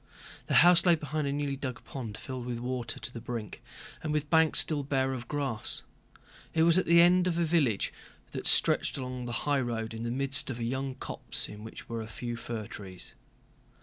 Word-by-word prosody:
The -, -, +1 dB
house 175 Hz, -1 st, +7 dB
lay 175 Hz, -2 st, +6 dB
behind 150 Hz, -1 st, -3 dB
a -, -, 0 dB
newly 145 Hz, -1 st, -1 dB
dug 130 Hz, -3 st, -5 dB
pond 115 Hz, -6 st, -6 dB
filled 130 Hz, -2 st, -6 dB
with 120 Hz, -1 st, -2 dB
water 125 Hz, -1 st, -3 dB
to 125 Hz, -, -5 dB
the 115 Hz, -, -7 dB
brink 115 Hz, -3 st, -6 dB, 0.4 s
and 155 Hz, -, -3 dB
with 150 Hz, -1 st, -1 dB
banks 160 Hz, -1 st, +5 dB
still 150 Hz, -2 st, +2 dB
bare 135 Hz, -1 st, 0 dB
of 120 Hz, -2 st, -6 dB
grass. 135 Hz, -7 st, -2 dB, 0.7 s
It 160 Hz, -, +4 dB
was 170 Hz, +2 st, +5 dB
at -, -, -2 dB
the 170 Hz, +1 st, +7 dB
end 180 Hz, +1 st, +6 dB
of 170 Hz, -2 st, 0 dB
a 170 Hz, -, +2 dB
village 145 Hz, -, +1 dB, 0.4 s
that -, -, -4 dB
stretched -, -, +4 dB
along 125 Hz, -2 st, -5 dB
the 120 Hz, -, -4 dB
highroad 120 Hz, -6 st, 0 dB
in 110 Hz, -, -6 dB
the 115 Hz, -, -2 dB
midst 135 Hz, +3 st, +1 dB
of 125 Hz, -, -3 dB
a 120 Hz, -, -4 dB
young 130 Hz, +2 st, -2 dB
copse -, -, -4 dB
in 105 Hz, 0 st, -10 dB
which 110 Hz, -, -10 dB
were 115 Hz, -1 st, -4 dB
a 110 Hz, -, -6 dB
few 120 Hz, +1 st, -5 dB
fir 115 Hz, -2 st, -5 dB
trees. 95 Hz, -3 st, -7 dB
130 Hz, 210 wpm, -30 LUFS, 120-150 Hz, 0.7 s, house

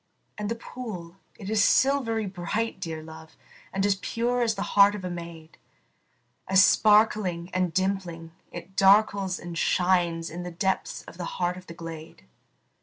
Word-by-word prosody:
And 210 Hz, -1 st, -4 dB
the 230 Hz, -, -1 dB
pool, 195 Hz, -8 st, -8 dB, 0.2 s
it 195 Hz, -, -9 dB
is 215 Hz, 0 st, +2 dB
silvery 250 Hz, -5 st, +2 dB
bright, 195 Hz, +4 st, -3 dB
dear 160 Hz, -3 st, -5 dB
love, 160 Hz, 0 st, -13 dB, 0.3 s
And 195 Hz, +1 st, 0 dB
as 205 Hz, -, +4 dB
pure 245 Hz, +2 st, -1 dB
as 225 Hz, -2 st, +1 dB
the 200 Hz, -, -3 dB
heart 200 Hz, 0 st, +6 dB
of 195 Hz, -3 st, -6 dB
a 180 Hz, -, -3 dB
maid, 170 Hz, -2 st, -9 dB, 0.9 s
As 190 Hz, 0 st, +6 dB
sparkling 210 Hz, -5 st, +3 dB
and 185 Hz, -2 st, 0 dB
dimpling, 180 Hz, -3 st, -2 dB, 0.2 s
it 175 Hz, +2 st, -10 dB
darkles 195 Hz, -1 st, +4 dB
and 175 Hz, -1 st, -8 dB
shines 175 Hz, -2 st, +1 dB
In 175 Hz, +2 st, -6 dB
the 180 Hz, -, -5 dB
depths 190 Hz, +3 st, -2 dB
of -, -, -13 dB
the 175 Hz, -, -4 dB
heart 175 Hz, 0 st, 0 dB
of 185 Hz, 0 st, -12 dB
the 170 Hz, -, -9 dB
glade. 165 Hz, -, -9 dB
185 Hz, 165 wpm, -26 LUFS, 170-210 Hz, 0.9 s, heart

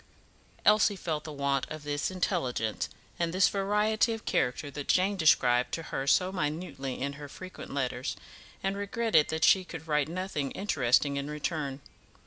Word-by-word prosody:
Elsie 210 Hz, -1 st, +5 dB
felt 160 Hz, -5 st, -3 dB
the 155 Hz, -, -6 dB
want 140 Hz, -1 st, 0 dB
of 155 Hz, -1 st, -7 dB
this 145 Hz, 0 st, -1 dB
intelligence 160 Hz, -, -1 dB, 0.3 s
and 170 Hz, -1 st, 0 dB
this 185 Hz, +2 st, +4 dB
variety 210 Hz, +3 st, +2 dB
of 225 Hz, -, -7 dB
character 125 Hz, +3 st, 0 dB
that 145 Hz, 0 st, -6 dB
Jane 190 Hz, +2 st, +3 dB
described 125 Hz, -8 st, +4 dB
to 165 Hz, -, -2 dB
her 135 Hz, -, -2 dB
so 185 Hz, +6 st, +4 dB
minutely 150 Hz, -5 st, -3 dB
in 140 Hz, +2 st, -2 dB
her 145 Hz, -, -7 dB
frequent 185 Hz, +5 st, -9 dB
letters, 130 Hz, -2 st, -2 dB, 0.5 s
and 195 Hz, 0 st, 0 dB
regretted 205 Hz, -4 st, +2 dB
that 160 Hz, 0 st, -2 dB
she 190 Hz, -, +5 dB
could 160 Hz, -3 st, -9 dB
write 150 Hz, -1 st, +1 dB
nothing 175 Hz, -5 st, -2 dB
interesting 140 Hz, -, +2 dB
in 140 Hz, +1 st, -3 dB
return. 150 Hz, -2 st, -3 dB
155 Hz, 160 wpm, -29 LUFS, 140-190 Hz, 0.5 s, Elsie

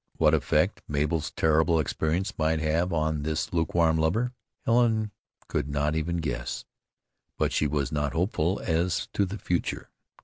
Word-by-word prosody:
What -, -, +4 dB
effect -, -, +2 dB
Mabel's 75 Hz, +2 st, 0 dB
terrible 80 Hz, +1 st, +3 dB
experience 80 Hz, +7 st, -1 dB
might 80 Hz, 0 st, +2 dB
have 80 Hz, +4 st, +1 dB
on 80 Hz, -2 st, 0 dB
this 80 Hz, +7 st, -2 dB
lukewarm 80 Hz, -1 st, +2 dB
lover, 110 Hz, +11 st, +1 dB, 0.3 s
Helen 115 Hz, -3 st, +3 dB, 0.4 s
could 70 Hz, -, -2 dB
not 75 Hz, +2 st, 0 dB
even 85 Hz, +2 st, -1 dB
guess; 65 Hz, -7 st, -3 dB, 0.7 s
but -, -, +1 dB
she 75 Hz, -, +2 dB
was 70 Hz, -2 st, -1 dB
not 75 Hz, -2 st, -1 dB
hopeful 90 Hz, +1 st, 0 dB
as 85 Hz, +1 st, 0 dB
to 100 Hz, -, +2 dB
the 100 Hz, +3 st, -5 dB
future. 90 Hz, -4 st, -2 dB
80 Hz, 145 wpm, -27 LUFS, 75-90 Hz, 0.7 s, What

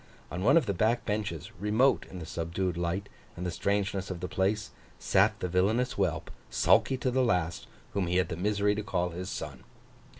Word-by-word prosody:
On 90 Hz, -, -3 dB
one 135 Hz, +9 st, +6 dB
of 165 Hz, -, +4 dB
the 100 Hz, -, 0 dB
back 110 Hz, +6 st, +1 dB
benches, 105 Hz, -3 st, -3 dB
remote 110 Hz, +7 st, +3 dB
in 95 Hz, -, -8 dB
the 85 Hz, -, -6 dB
subdued 85 Hz, +3 st, -2 dB
light 85 Hz, +3 st, -2 dB, 0.3 s
and 90 Hz, -, -4 dB
the 90 Hz, -, -1 dB
strangeness 100 Hz, +2 st, -1 dB
of 95 Hz, -2 st, -4 dB
the 90 Hz, -, -3 dB
place, 105 Hz, +4 st, 0 dB, 0.3 s
sat -, -, +3 dB
the -, -, 0 dB
villainous 105 Hz, +8 st, +2 dB
whelp, 85 Hz, -5 st, -1 dB, 0.2 s
sulky 135 Hz, -, +3 dB
to 130 Hz, 0 st, 0 dB
the 130 Hz, +1 st, +2 dB
last, 90 Hz, -8 st, 0 dB, 0.3 s
whom 95 Hz, -3 st, 0 dB
he 90 Hz, +1 st, +1 dB
had 90 Hz, -3 st, +2 dB
the -, -, -3 dB
misery 105 Hz, +3 st, +1 dB
to 105 Hz, -, -2 dB
call 90 Hz, -3 st, -1 dB
his 90 Hz, +3 st, -5 dB
son. -, -, -6 dB
95 Hz, 200 wpm, -29 LUFS, 90-105 Hz, 0.3 s, one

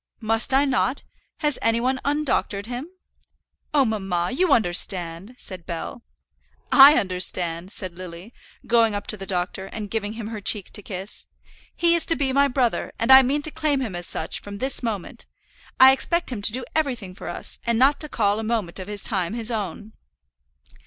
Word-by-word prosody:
"Must 225 Hz, +1 st, 0 dB
I 270 Hz, +2 st, +4 dB
not? 265 Hz, 0 st, 0 dB, 0.4 s
Has 295 Hz, -2 st, 0 dB
any 230 Hz, 0 st, +2 dB
one 260 Hz, +2 st, 0 dB
undoctored 280 Hz, -8 st, -1 dB
him?" 245 Hz, +5 st, -5 dB, 0.8 s
"Oh, 285 Hz, -3 st, +3 dB
mamma, 190 Hz, -5 st, -1 dB
you 345 Hz, +6 st, +1 dB
understand," 180 Hz, 0 st, +1 dB
said 185 Hz, -7 st, -9 dB
Bell. 170 Hz, +7 st, -6 dB, 0.7 s
"I 280 Hz, +2 st, +9 dB
understand," 180 Hz, -2 st, +1 dB
said 185 Hz, -5 st, -7 dB
Lily, 180 Hz, +5 st, -10 dB, 0.3 s
going 230 Hz, -2 st, +3 dB
up 205 Hz, -, -4 dB
to -, -, -2 dB
the 195 Hz, -2 st, -9 dB
doctor, 185 Hz, +1 st, -3 dB
and 205 Hz, 0 st, -7 dB
giving 215 Hz, -1 st, -2 dB
him 220 Hz, -1 st, -6 dB
her 220 Hz, -2 st, -6 dB
cheek 200 Hz, -1 st, 0 dB
to 205 Hz, -, -4 dB
kiss, 190 Hz, 0 st, -7 dB, 0.5 s
"he 340 Hz, 0 st, +3 dB
is 340 Hz, -, +1 dB
to 330 Hz, -, +2 dB
be 270 Hz, -3 st, 0 dB
my 280 Hz, +1 st, +4 dB
brother, 250 Hz, -3 st, 0 dB
and 230 Hz, +3 st, +1 dB
I 265 Hz, 0 st, +11 dB
mean 280 Hz, +3 st, 0 dB
to 310 Hz, -, 0 dB
claim 305 Hz, -3 st, 0 dB
him 225 Hz, -8 st, -4 dB
as 175 Hz, -1 st, -4 dB
such 160 Hz, -, -2 dB
from 200 Hz, 0 st, -8 dB
this 265 Hz, +5 st, -1 dB
moment. 220 Hz, -7 st, -5 dB, 0.5 s
I 260 Hz, 0 st, +9 dB
expect 340 Hz, +4 st, -1 dB
him 225 Hz, -5 st, -4 dB
to 205 Hz, -, +5 dB
do 250 Hz, +2 st, -3 dB
everything 250 Hz, -12 st, -2 dB
for 185 Hz, -, -8 dB
us, -, -, -4 dB
and 235 Hz, -1 st, +2 dB
not 270 Hz, +4 st, +4 dB
to 305 Hz, -, -4 dB
call 205 Hz, -4 st, +1 dB
a -, -, -4 dB
moment 215 Hz, -5 st, -2 dB
of 185 Hz, -, -7 dB
his 205 Hz, -1 st, -6 dB
time 190 Hz, -1 st, -1 dB
his 235 Hz, 0 st, -4 dB
own." 215 Hz, 0 st, -5 dB
225 Hz, 190 wpm, -23 LUFS, 195-265 Hz, 0.8 s, I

